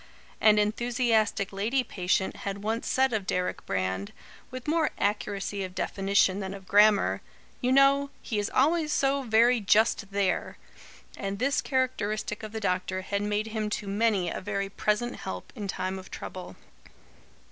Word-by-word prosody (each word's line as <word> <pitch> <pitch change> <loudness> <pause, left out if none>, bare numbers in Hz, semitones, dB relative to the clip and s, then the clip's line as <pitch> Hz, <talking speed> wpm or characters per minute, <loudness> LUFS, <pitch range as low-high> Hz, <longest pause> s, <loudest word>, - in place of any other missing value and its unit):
An 215 -1 +6
enthusiastic 220 -1 +1
lady 225 +7 0
patient 190 -4 -1
had 200 0 -5
once 225 +2 -2
said 265 -1 +2
of 205 -3 -2
Deryck 180 0 -1
Brand, 95 +1 -2 0.4
with 255 +1 -8
more 320 +1 +2
accuracy 205 -1 -1
of 185 -1 -7
definition 195 -1 +1
than 195 -1 -4
of 190 -1 -12
grammar: 210 0 +4 0.4
"You 250 - +1
know, 275 +1 +5
he 215 -4 -3
is 205 - -1
always 305 +3 +2
so 275 -1 +2
very 235 0 +4
JUST 210 0 +2
THERE." 195 -2 -1 0.6
And 195 0 -3
this 275 +6 +1
characteristic 215 -6 -1
of 215 -1 -7
the 220 - -4
doctor 185 -1 -1
had 200 +1 -2
made 210 +1 -1
him 215 -1 -2
to 210 -1 -3
many 200 -2 +1
a - - -4
very 200 0 -2
present 210 +4 -1
help 90 -1 -7
in 205 - -5
time 190 0 -3
of 185 - -12
trouble. 180 - -8
210 Hz, 160 wpm, -28 LUFS, 195-240 Hz, 0.6 s, An